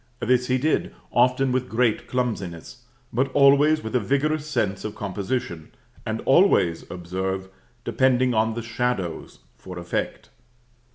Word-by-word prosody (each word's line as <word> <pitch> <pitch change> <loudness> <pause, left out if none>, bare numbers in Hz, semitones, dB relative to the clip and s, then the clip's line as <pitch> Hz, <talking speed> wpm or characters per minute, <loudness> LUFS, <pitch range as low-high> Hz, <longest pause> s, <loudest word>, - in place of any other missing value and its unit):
This 125 0 +1
he 130 - +2
did, 150 +4 0 0.2
often 125 +2 +3
with 125 0 -1
great 115 -1 +1
clumsiness, 115 -4 -4 0.3
but 130 +3 0
always 145 +2 +5
with 110 +3 -5
a - - +4
vigorous 145 +6 0
sense 100 -10 -1
of 110 - -5
composition, 100 -4 -4 0.4
and 110 0 -2
always, 135 - +3
observe, 95 +2 -4 0.3
depending 130 0 +2
on 110 0 +1
the 115 - -4
shadows 115 -7 -3 0.2
for 90 -1 -9
effect. 85 0 -4
120 Hz, 130 wpm, -24 LUFS, 95-130 Hz, 0.4 s, always